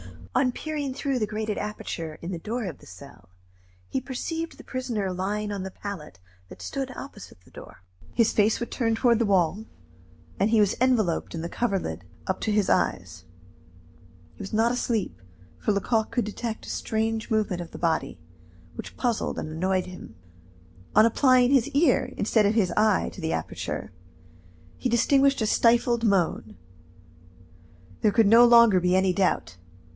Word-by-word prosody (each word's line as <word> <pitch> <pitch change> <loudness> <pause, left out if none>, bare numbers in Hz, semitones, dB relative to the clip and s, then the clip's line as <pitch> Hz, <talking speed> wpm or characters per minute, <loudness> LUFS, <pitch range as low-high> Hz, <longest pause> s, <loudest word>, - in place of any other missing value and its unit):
On 255 -2 +2
peering 290 -3 -4
through 275 -2 -1
the 215 - 0
grated 215 0 -3
aperture 165 -6 -5
in 170 - -5
the 175 - -4
door 230 +7 -4
of 170 -7 -6
the - - -17
cell, 90 0 -14 0.6
he 265 - -2
perceived 325 +6 -5
the - - -12
prisoner 235 -7 -3
lying 205 +3 -2
on 200 -2 -3
the 190 - -5
pallet 185 - -8 0.3
that - - -13
stood 270 -1 -4
opposite 205 - -10
the - - -22
door. - - -13 0.3
His 230 -2 +3
face 215 +1 +2
was 235 - -4
turned 225 -2 0
toward 235 -1 +3
the 230 - +2
wall, 190 +2 +1 0.7
and 200 - +3
he 220 -1 +4
was 205 -1 +2
enveloped 220 -12 +1
in 165 - -4
the 170 - -4
coverlid 190 - -2 0.2
up 190 - -2
to 220 - -1
his 210 -2 +1
eyes. 90 -1 -1 1.1
He - - -25
was 195 - -7
not 225 +2 +3
asleep, 235 - -2 0.4
for - - 0
Lecoq 220 +2 0
could 240 - 0
detect 220 +1 -5
a - - -9
strange 220 0 -2
movement 210 -5 0
of 170 - -9
the - - -9
body, 165 - -1 0.6
which - - -9
puzzled 240 -3 -1
and - - -4
annoyed 185 +4 0
him. 180 -11 -11 0.8
On 215 - +7
applying 250 +1 +4
his 270 -3 +4
ear 290 -1 +2
instead 215 0 +2
of 210 - 0
his 195 -6 +2
eye 215 -2 +2
to 190 - -11
the 160 0 -1
aperture, - - -4 0.9
he 255 - -2
distinguished 270 +3 +3
a - - +2
stifled 235 +1 +3
moan. 175 - 0 1.4
There 210 - +2
could 225 -1 +4
no 230 +3 +8
longer 235 -5 +7
be 180 +1 +2
any 190 -1 +3
doubt. 95 - 0
215 Hz, 170 wpm, -26 LUFS, 185-240 Hz, 1.4 s, no